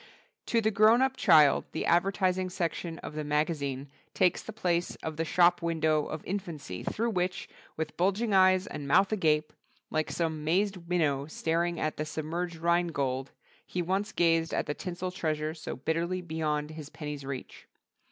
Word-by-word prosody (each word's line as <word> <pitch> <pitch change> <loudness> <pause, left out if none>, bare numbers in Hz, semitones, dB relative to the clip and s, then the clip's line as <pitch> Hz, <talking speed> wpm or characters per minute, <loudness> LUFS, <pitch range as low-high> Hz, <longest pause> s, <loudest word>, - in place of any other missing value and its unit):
To 230 - +2
the 220 0 +2
grown 220 +4 +5
up 265 0 +1
child 155 - +5
the - - -2
advertising 185 +1 +2
section 170 -2 -3
of - - -6
the 155 0 -3
magazine 145 -2 -1 0.3
takes 180 - +3
the - - -8
place 180 -5 -1
of 160 -1 -3
the 165 - -1
Shop 175 +2 +4
Window 160 -2 +1
of 155 - -6
infancy 160 - -5
through 230 +2 -1
which, 180 -2 -1 0.3
with 160 - -3
bulging 200 +5 +1
eyes 185 0 +5
and 145 -2 -6
mouth 195 +8 +4
agape, 155 -6 +1 0.4
like 155 0 0
some 160 -3 -2
mazed 180 +1 0
minnow 145 -6 +1
staring 165 +2 -1
at 155 -1 -2
the 155 - -2
submerged 165 +3 -3
Rhine 170 +1 +2
Gold, 135 -4 -2 0.3
he 180 - -3
once 195 +5 -1
gazed 165 -3 +2
at - - 0
the 150 - -2
tinsel 180 +2 -5
treasure 155 -3 -2
so 160 - -6
bitterly 170 +7 -1
beyond 155 -2 -2
his 155 -2 -8
penny's 150 -2 -6
reach. 135 -1 -7
165 Hz, 170 wpm, -29 LUFS, 155-185 Hz, 0.4 s, grown